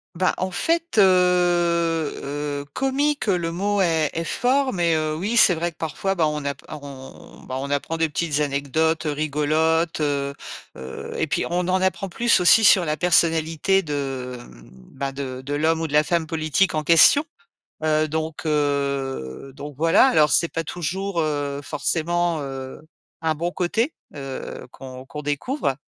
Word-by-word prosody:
Bah 185 +2 +1
en 185 - -2
fait, 330 - -1
heu, 205 - +8
heu, 170 -5 +1
comique, 280 +2 0
le 175 -5 0
mot 200 +3 0
est 160 -4 +2
est 165 - -2
fort, 260 +7 +1
mais 170 -3 +1
heu, 155 0 -1
oui, 205 +7 -2
c'est 200 -6 +6
vrai 170 +1 -2
que - - -43
parfois, 195 +5 -2
bah, 165 -4 +2
on 150 -1 -3
app 140 -1 -3
on 140 -3 -11
bah 130 - -5
on 140 - -5
apprend 145 +3 -2
des 165 0 +2
petites 150 -1 -2
anecdotes 150 +3 0
rigolotes, 155 +2 0
heu, 140 -2 -1 0.4
heu, 65 0 -8
et - - 0
puis - - -1
on 175 +1 -1
en 185 0 +1
apprend 190 +1 0
plus 230 +4 +2
aussi 180 +5 +6
sur 190 -4 +6
la 150 -1 0
personnalité 165 +2 +2
de, 135 -4 -4
mmh, - - -15 0.3
bah 135 0 -3
de 135 -2 -6
de 145 - -3
l'homme 160 +2 +1
ou 160 - -1
de - - -11
la 150 0 +5
femme 170 -1 0
politique 160 +3 0
en 155 - -1
question. 170 - +6 0.6
Heu, 155 0 +2
donc 160 +1 -4
heu, 140 - -2
donc 145 +1 -9
voilà, 165 - +5
alors 155 - +4
c'est 170 - +4
pas 165 0 -4
toujours, 180 +3 -3
heu, 145 -3 -1
forcément, 170 +3 -1
heu, 135 -1 -7 0.4
un 160 -1 0
bon 170 +3 -2
côté, 225 - -1 0.2
heu, 135 -2 -7
qu'on 130 -1 -10
qu'on 150 +2 -8
découvre 145 - -1
160 Hz, 170 wpm, -23 LUFS, 145-175 Hz, 0.6 s, heu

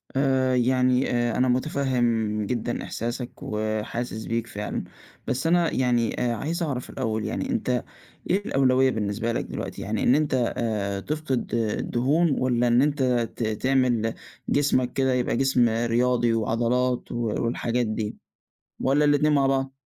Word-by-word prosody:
آآ 130 -1 +2
يعني 125 +1 +2
آآ 120 -1 0
أنا 130 - +3
مُتفهم 120 -5 0
جدًا 120 +1 -2
إحساسك 120 +2 -4
وحاسِس 110 +1 -3
بيك 115 0 -2
فعلًا، 105 -2 -4 0.4
بس 130 +5 -1
أنا 170 0 +3
يعني 120 -3 +1
آآ 120 -1 +1
عايز 165 - -2
أعرف 135 -6 -3
الأول 110 -4 -2
يعني، 115 - -3
أنت 130 - 0 0.5
إيه 200 +3 +1
الأولوية 130 -1 +3
بالنسبة 110 +1 -2
لك - - -2
دلوقتي، - - -6
يعني 105 +1 -2
إن 125 - +5
أنت 135 -5 +1
آآ 100 -4 -1
تفقد 145 +1 -3
الدهون، 125 +8 +1
والّا 125 -1 +2
إن 120 +1 +4
أنت 145 -1 +1 0.3
ت - - -3
تعمل 120 0 +1 0.4
جسمك 135 -3 +2
كده 130 -1 +1
يبقى 125 -2 0
جسم 125 -3 +3
رياضي 120 +1 +1
وعضلات 120 +3 0
و - - -4 0.3
والحاجات 120 +1 0
دي، 110 -1 -3 0.6
والّا 140 +3 +2
الاتنين 145 +1 +3
مع 140 -2 +3
بعض؟ 135 0 0
125 Hz, 145 wpm, -25 LUFS, 115-135 Hz, 0.6 s, إن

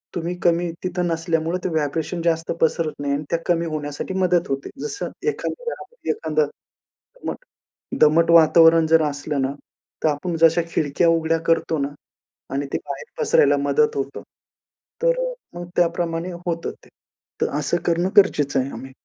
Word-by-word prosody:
तुम्ही 175 +1 -2
कमी 170 0 +2
तिथं 180 -1 -1
नसल्यामुळं, 165 0 0
ते - - 0
व्हायब्रेशन 160 +2 -1
जास्त 165 -1 0
पसरत 160 0 +1
नाही 140 -1 -1
आणि 145 +1 -1
त्या 170 - 0
कमी 170 -1 +1
होण्यासाठी 150 +2 -4
मदत 180 -2 +2
होते. 135 0 -3
जसं 410 -2 -4 0.2
एखाद्या - - -4
घरामध्ये 485 0 -6
एखादं 460 +1 0 0.7
दमट - - -3 0.6
दमट 165 +2 +5
वातावरण 165 0 +7
जर 165 0 +5
असलं 145 0 -3
ना, 135 +1 -1 0.5
तर - - +4
आपण 155 +4 -2
जशा 165 +1 +5
खिडक्या 155 +1 +1
उघड्या 165 0 +2
करतो 165 -1 +2
ना 140 0 -1 0.6
आणि 140 +1 -1
ते - - +2
बाहेर 140 -1 -6 0.2
पसरायला 145 0 +4
मदत 140 +1 +2
होतं, 135 0 -3 0.8
तर - - +3
अ, - - -5 0.2
मग 175 0 -6
त्याप्रमाणे 170 0 0 0.2
होतं 170 -1 -2
ते. - - -20 0.5
तर - - +2
असं 150 +4 0
करणं 175 +2 +1
गरजेचं 145 -9 +4
आहे 130 +1 -1
आम्ही. 135 - -8
165 Hz, 160 wpm, -22 LUFS, 145-175 Hz, 0.8 s, वातावरण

